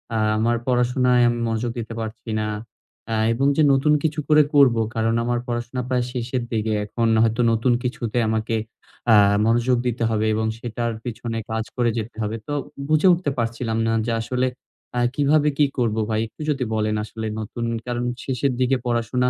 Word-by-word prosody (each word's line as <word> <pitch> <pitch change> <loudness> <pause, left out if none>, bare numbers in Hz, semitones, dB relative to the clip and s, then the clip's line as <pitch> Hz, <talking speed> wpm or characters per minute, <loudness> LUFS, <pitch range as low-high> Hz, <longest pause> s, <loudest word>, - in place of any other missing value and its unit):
আ - - +1 0.2
আমার 115 +2 +2
পড়াশোনায় 125 0 +3
আমি 120 - -1
মনোযোগ 115 +1 -1
দিতে 115 0 -5
পারছি 110 +1 -6
না। 105 - -1 0.6
আ - - +1 0.2
এবং 135 +4 +1
যে 155 - +5
নতুন 150 +3 +3
কিছু 155 -1 0
করে 150 -1 +6
করবো, 125 -5 +5
কারণ 115 0 +1
আমার 120 0 0
পড়াশোনা 120 +1 -3
প্রায় 125 -1 +1
শেষের 125 0 -2
দিকে। 110 -1 0
এখন 115 +2 -1 0.2
হয়তো 115 +2 +1
নতুন 115 +2 +2
কিছুতে 120 -2 -3
আমাকে 110 +1 -1 0.6
আ - - +8 0.3
মনোযোগ 120 +2 +2
দিতে 120 0 -1
হবে, 110 -1 0
এবং 110 0 0
সেটার 120 0 -3
পেছনে 115 -1 -4
কাজ 110 0 -1
করে 120 -2 +2
যেতে 110 0 -5
হবে। 105 +2 -2
তো 145 - -3 0.3
বুঝে 155 +4 +4
উঠতে 170 -5 -1
পারছিলাম 115 -1 -2
না, - - +2 0.2
যে 115 - 0
আসলে 125 +2 0 0.5
আ - - +2 0.2
কিভাবে 150 +1 +3
কি 150 - +5
করব 115 -4 +1
ভাই? 110 -1 0
একটু 110 - -14
যদি 135 -3 0
বলেন, 110 0 0
আসলে 110 +1 -6
নতুন, 115 +2 -4 0.2
কারণ 120 0 -2 0.2
শেষের 130 0 -1
দিকে 130 +1 +3
পড়াশোনা 120 +1 +1
120 Hz, 180 wpm, -22 LUFS, 115-125 Hz, 0.6 s, আ